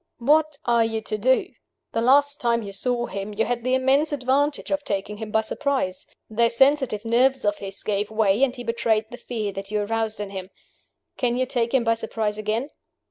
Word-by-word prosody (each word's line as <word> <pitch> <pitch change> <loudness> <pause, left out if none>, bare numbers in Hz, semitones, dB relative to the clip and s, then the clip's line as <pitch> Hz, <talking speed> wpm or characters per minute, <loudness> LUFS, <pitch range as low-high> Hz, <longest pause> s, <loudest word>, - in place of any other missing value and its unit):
What 300 +4 +2
are 235 -1 +4
you 225 0 -1
to 215 0 -2
do? 260 +5 +2 0.4
The 230 - -1
last 285 +4 +4
time 235 -1 +1
you 200 - -7
saw 240 +4 0
him, 200 +1 -6
you 225 - +1
had 240 -1 -2
the 255 +1 +2
immense 270 +4 +2
advantage 285 +2 0
of 290 0 0
taking 200 -1 -3
him 220 0 -6
by 220 +1 +2
surprise. 255 -6 -2 0.2
Those 230 +1 +1
sensitive 265 -5 +3
nerves 255 +2 +2
of 205 0 +1
his 195 0 -7
gave 205 0 -1
way, 215 0 +2
and 260 -2 +2
he 245 - -7
betrayed 230 -2 +1
the 245 - -7
fear 220 -5 -4
that 195 0 -7
you 210 0 0
aroused 220 +1 -2
in 205 -1 -5
him. 190 -1 -6 0.7
Can 245 -2 0
you 255 - +1
take 240 -2 -1
him 265 -3 +3
by 230 -1 +3
surprise 220 -2 -3
again? 220 +7 -2
230 Hz, 205 wpm, -24 LUFS, 210-260 Hz, 0.7 s, are